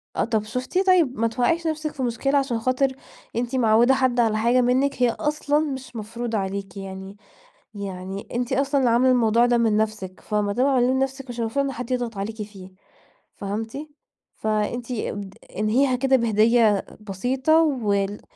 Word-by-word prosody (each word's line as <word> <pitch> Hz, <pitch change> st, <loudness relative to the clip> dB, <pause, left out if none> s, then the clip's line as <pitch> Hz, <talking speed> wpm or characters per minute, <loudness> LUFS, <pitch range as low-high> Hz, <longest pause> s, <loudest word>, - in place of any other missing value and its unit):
آه، -, -, +1 dB
طَب 220 Hz, -2 st, 0 dB
شُفتِ، 255 Hz, -, -2 dB
طيب 325 Hz, -11 st, +3 dB
ما 230 Hz, -, +3 dB
توقعيش 325 Hz, +9 st, 0 dB
نَفْسِك 310 Hz, -1 st, -2 dB
في 265 Hz, -3 st, -4 dB
مشكلة 275 Hz, +4 st, 0 dB
عشان 260 Hz, -4 st, 0 dB
خاطر 255 Hz, +2 st, 0 dB, 0.4 s
أنتِ 245 Hz, +2 st, -2 dB
معوّدة 235 Hz, +1 st, +4 dB
حد 255 Hz, -2 st, +1 dB
على 220 Hz, -2 st, +2 dB
حاجة 240 Hz, +3 st, +3 dB
منِّك، 255 Hz, +2 st, +1 dB
هي 240 Hz, -, +5 dB
أصلًا 295 Hz, +3 st, 0 dB
مش 265 Hz, -5 st, -4 dB
مفروضة 225 Hz, +1 st, -4 dB
عليكِ 195 Hz, +1 st, -4 dB
يعني 190 Hz, +1 st, -8 dB, 0.6 s
يعني 195 Hz, -1 st, -6 dB
أنتِ 245 Hz, +2 st, -1 dB
أصلًا 275 Hz, +1 st, +1 dB
اللي 250 Hz, -3 st, +3 dB
عاملة 255 Hz, +2 st, +4 dB
الموضوع 235 Hz, -1 st, +4 dB
ده 240 Hz, -1 st, +3 dB
من 220 Hz, -2 st, +2 dB
نَفْسِك 210 Hz, -4 st, -2 dB
فما 210 Hz, -1 st, -1 dB
دام 250 Hz, +4 st, +2 dB
عاملاه 255 Hz, -2 st, +3 dB
لنَفْسِك 270 Hz, 0 st, -2 dB
مش 240 Hz, 0 st, -6 dB
المفروض 235 Hz, +5 st, 0 dB
إن 270 Hz, -, -2 dB
حد 250 Hz, 0 st, -6 dB
يضغط 240 Hz, -4 st, -2 dB
عليكِ 215 Hz, +2 st, -4 dB
فيه، 195 Hz, -3 st, -9 dB, 0.7 s
فهمتِ؟ 220 Hz, +5 st, -4 dB, 0.6 s
فأنتِ 220 Hz, +3 st, -2 dB
أبد 205 Hz, -4 st, -4 dB, 0.2 s
انهيها 250 Hz, +5 st, +2 dB
كده 265 Hz, +1 st, +2 dB
بهدية 225 Hz, -2 st, +3 dB, 0.2 s
بسيطة 260 Hz, -, +2 dB
وال 205 Hz, -9 st, 0 dB
240 Hz, 165 wpm, -23 LUFS, 215-265 Hz, 0.7 s, هي